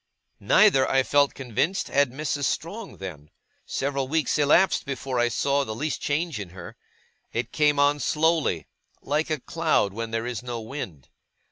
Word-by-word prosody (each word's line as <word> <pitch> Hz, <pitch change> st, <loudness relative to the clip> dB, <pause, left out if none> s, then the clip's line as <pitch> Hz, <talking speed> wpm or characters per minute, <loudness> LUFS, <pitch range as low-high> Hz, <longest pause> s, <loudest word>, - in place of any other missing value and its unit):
Neither, 190 Hz, -12 st, +4 dB
I 135 Hz, 0 st, +3 dB
felt 145 Hz, +1 st, +2 dB
convinced, 135 Hz, -, -1 dB
had 140 Hz, -1 st, +3 dB
Mrs. 145 Hz, +1 st, -2 dB
Strong 200 Hz, -, -4 dB
then. 80 Hz, -6 st, -8 dB, 0.4 s
Several 135 Hz, -1 st, -2 dB
weeks 155 Hz, +1 st, 0 dB
elapsed 160 Hz, +6 st, +4 dB
before 135 Hz, -2 st, -3 dB
I 120 Hz, -, +3 dB
saw 140 Hz, +4 st, +1 dB
the 110 Hz, -4 st, -5 dB
least 150 Hz, +6 st, -3 dB
change 155 Hz, -1 st, -1 dB
in 100 Hz, -3 st, -6 dB
her. 85 Hz, -1 st, -9 dB, 0.6 s
It 120 Hz, +1 st, -2 dB
came 150 Hz, -1 st, +2 dB
on 145 Hz, +1 st, +3 dB
slowly, 155 Hz, -, +1 dB, 0.4 s
like 150 Hz, +3 st, 0 dB
a 155 Hz, -2 st, -1 dB
cloud 155 Hz, -, 0 dB
when 115 Hz, +2 st, -4 dB
there 115 Hz, +1 st, -2 dB
is 125 Hz, -2 st, -4 dB
no 120 Hz, -1 st, -5 dB
wind. 110 Hz, -, -7 dB
140 Hz, 160 wpm, -25 LUFS, 115-150 Hz, 0.6 s, Neither